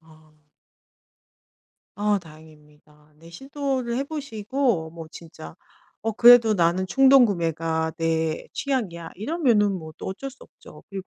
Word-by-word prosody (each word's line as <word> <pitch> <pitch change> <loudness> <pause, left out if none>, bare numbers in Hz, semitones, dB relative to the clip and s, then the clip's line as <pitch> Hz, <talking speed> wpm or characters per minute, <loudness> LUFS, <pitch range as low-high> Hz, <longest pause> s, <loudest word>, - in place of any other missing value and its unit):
아. 155 -1 -22 1.6
아 205 0 +1
다행입니다. 150 -2 -19
네 165 +2 -16
시도를 265 - -4
해 275 - -1
보시고 250 - -2
뭐 165 -1 -10
진짜 160 - -12 0.5
'어 225 +1 -2
그래도 235 -1 +7
나는 175 +1 +1
충동구매가 170 - +2
내 160 -1 -1
취향이야.' 195 - -3
이러면은 225 - +1
뭐 160 -4 -7
또 - - -8
어쩔 270 +9 -6
수 265 - -19
없죠. - - -16
그리고 195 -1 -7
185 Hz, 260 characters per minute, -24 LUFS, 160-245 Hz, 1.6 s, 그래도